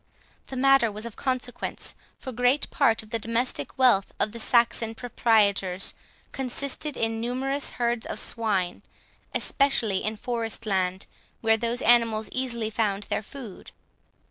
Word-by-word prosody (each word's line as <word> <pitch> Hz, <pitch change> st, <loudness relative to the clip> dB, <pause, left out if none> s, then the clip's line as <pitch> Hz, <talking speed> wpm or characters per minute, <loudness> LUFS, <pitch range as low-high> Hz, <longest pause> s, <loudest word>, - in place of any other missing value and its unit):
The 265 Hz, -, -7 dB
matter 270 Hz, -3 st, +4 dB
was 215 Hz, +2 st, -6 dB
of 235 Hz, -, -7 dB
consequence, 255 Hz, -2 st, -3 dB, 0.2 s
for 260 Hz, -, -7 dB
great 250 Hz, +4 st, +2 dB
part 230 Hz, -8 st, +3 dB
of 215 Hz, -, -17 dB
the 230 Hz, -, -1 dB
domestic 230 Hz, +3 st, -1 dB
wealth 245 Hz, -7 st, +4 dB
of 210 Hz, -, +1 dB
the 235 Hz, -, -8 dB
Saxon 230 Hz, -1 st, +2 dB
proprietors 205 Hz, -6 st, +2 dB, 0.4 s
consisted 270 Hz, +2 st, -1 dB
in 225 Hz, 0 st, -1 dB
numerous 265 Hz, +4 st, -1 dB
herds 235 Hz, -1 st, 0 dB
of -, -, -4 dB
swine, 200 Hz, -6 st, 0 dB, 0.5 s
especially 235 Hz, -8 st, +1 dB
in 215 Hz, +1 st, -1 dB
forest 230 Hz, 0 st, -3 dB
land, 190 Hz, -2 st, 0 dB, 0.4 s
where 225 Hz, -1 st, +4 dB
those 235 Hz, +2 st, -1 dB
animals 225 Hz, -3 st, +4 dB
easily 235 Hz, -4 st, -1 dB
found 210 Hz, -3 st, 0 dB
their 205 Hz, -, -2 dB
food. 225 Hz, -2 st, -10 dB
230 Hz, 140 wpm, -26 LUFS, 215-250 Hz, 0.5 s, matter